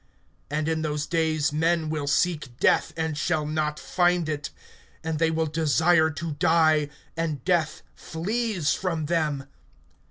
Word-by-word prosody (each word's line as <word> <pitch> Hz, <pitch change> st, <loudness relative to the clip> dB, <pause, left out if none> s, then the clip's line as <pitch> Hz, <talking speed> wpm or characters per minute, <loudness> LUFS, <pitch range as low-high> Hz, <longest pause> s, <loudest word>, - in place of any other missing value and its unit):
(6)And 150 Hz, +1 st, -1 dB
in 160 Hz, -1 st, 0 dB
those 150 Hz, -1 st, -2 dB
days 155 Hz, -3 st, 0 dB
men 165 Hz, +1 st, +1 dB
will 155 Hz, -2 st, -3 dB
seek 145 Hz, -3 st, 0 dB
death, -, -, +3 dB
and 160 Hz, -1 st, -1 dB
shall 155 Hz, 0 st, 0 dB
not 150 Hz, 0 st, -1 dB
find 175 Hz, -2 st, +1 dB
it; 150 Hz, -1 st, -3 dB, 0.5 s
and 160 Hz, -1 st, -2 dB
they 165 Hz, 0 st, +3 dB
will 160 Hz, 0 st, 0 dB
desire 160 Hz, +1 st, +3 dB
to 160 Hz, +2 st, -5 dB
die, 155 Hz, -3 st, +3 dB, 0.3 s
and 160 Hz, -4 st, -3 dB
death 170 Hz, -4 st, +1 dB
flees 200 Hz, 0 st, -1 dB
from 165 Hz, -5 st, -2 dB
them. 150 Hz, -4 st, 0 dB
160 Hz, 140 wpm, -25 LUFS, 150-165 Hz, 0.5 s, death